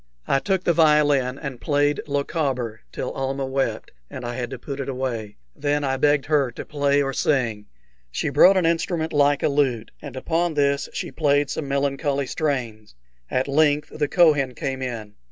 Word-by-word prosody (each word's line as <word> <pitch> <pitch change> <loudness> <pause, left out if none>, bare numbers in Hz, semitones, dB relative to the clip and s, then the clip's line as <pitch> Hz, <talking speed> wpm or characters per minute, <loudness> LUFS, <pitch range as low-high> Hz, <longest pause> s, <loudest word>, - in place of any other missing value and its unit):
I 135 - +3
took 190 +3 -1
the 170 - +3
violin 145 -5 +3
and 135 -4 -7
played 145 -1 +1
"Lochaber" 140 -6 -2
till - - -4
Almah 135 0 -2
wept, 135 0 -2 0.2
and 130 - -7
I 120 - -3
had 120 -1 -4
to - - -6
put 140 -1 -7
it 140 - -3
away. 125 -5 -3 0.2
Then 145 0 0
I 135 -1 0
begged 145 +1 +2
her 145 -4 +2
to - - -7
play 145 -1 +1
or 135 0 -2
sing. 115 -8 0 0.4
She - - -2
brought 190 +1 +6
an 180 - +2
instrument 165 -1 0
like 145 -1 +3
a - - +4
lute, 135 -6 0
and 140 -4 -8
upon 165 +4 -1
this 140 -1 +1
she - - -5
played 145 -2 +1
some 150 - -3
melancholy 140 0 0
strains. 120 - -3 0.3
At 130 +2 0
length 145 +1 +2
the 145 - 0
Kohen 145 -6 +3
came 130 +2 -3
in. 115 -5 -5
140 Hz, 180 wpm, -23 LUFS, 130-150 Hz, 0.4 s, brought